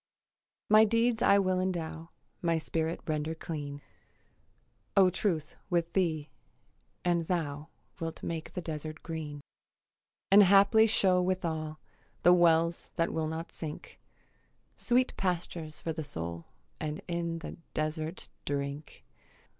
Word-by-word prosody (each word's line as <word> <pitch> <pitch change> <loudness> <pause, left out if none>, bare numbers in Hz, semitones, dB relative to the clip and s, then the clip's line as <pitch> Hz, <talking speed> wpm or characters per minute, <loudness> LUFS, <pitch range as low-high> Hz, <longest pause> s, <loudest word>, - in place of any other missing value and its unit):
My 215 +1 +7
deeds 230 +1 +2
I 200 - +6
will 185 -2 +2
endow, 165 -3 -3 0.3
My 170 -1 +2
spirit 160 +1 -2
render 155 +1 -1
clean, 145 -3 -6 1.1
O 190 -2 +7
Truth, 165 -5 -1
with 170 -1 0
thee; 160 -5 0 0.7
and 170 -2 +1
thou 150 -4 -2 0.3
Wilt 165 -1 -5
make 160 -1 -4
the 180 - -4
desert 155 -1 -5
green; 155 -3 -5 0.9
And 200 +1 +9
haply 200 +3 +6
show 185 -4 +4
withal 160 -4 -1 0.5
The 175 - +8
wells 170 -1 +3
that 165 - 0
will 160 -1 0
not 160 +1 -5
sink, 155 -2 -7 0.8
Sweet 250 +1 +2
pastures 170 -4 -2
for 165 - -2
the 160 0 -4
soul, 85 - -5 0.3
And 150 0 -3
in 170 -1 -2
the 165 - -7 0.2
desert 155 +2 -2 0.2
drink. 140 +1 -4
165 Hz, 120 wpm, -30 LUFS, 155-180 Hz, 1.1 s, And